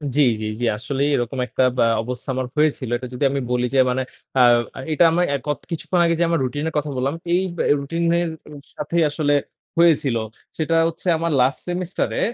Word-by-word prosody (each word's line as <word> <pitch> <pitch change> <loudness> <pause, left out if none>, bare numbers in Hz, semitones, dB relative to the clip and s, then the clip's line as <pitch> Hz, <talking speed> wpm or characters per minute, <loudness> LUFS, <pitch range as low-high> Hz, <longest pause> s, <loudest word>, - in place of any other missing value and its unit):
জি, 150 - +4 0.2
জি, - - -3
জি। - - -4
আসলেই 140 +5 -1
এরকম 120 +2 -2
একটা 130 - 0
বা - - +4 0.2
অবস্থা 125 +3 -6
আমার 130 -1 -2
হয়েছিল। 150 -5 +1
এটা 125 +1 -7
যদি 125 - -3
আমি 140 0 -1
বলি 125 0 +1
যে, - - +5
মানে 125 +1 0 0.3
অ্যা 130 - +5 0.5
এটা 155 - +4
আমরা 175 +2 +2
এ - - +2
ক - - -11 0.2
কিছুক্ষণ 170 +2 -1
আগে 170 0 +2
যে - - +4
আমার 165 -1 +1
রুটিন 145 +4 -2
এর - - -12
কথা 150 0 -1
বললাম, 135 +4 -1 0.2
এই 180 - +3 0.2
ব্য - - 0 0.2
রুটিন 165 +5 -3 0.2
এর 175 - -1 0.5
সাথেই 165 +3 0
আসলে 145 -1 0 0.4
হয়েছিল। 155 -7 +4 0.4
সেটা 165 +1 0
হচ্ছে 165 +2 -6
আমার 165 +1 -1
লাস্ট 130 +3 +2
সেমিস্টারে 180 +1 -2
145 Hz, 200 wpm, -21 LUFS, 130-165 Hz, 0.5 s, যে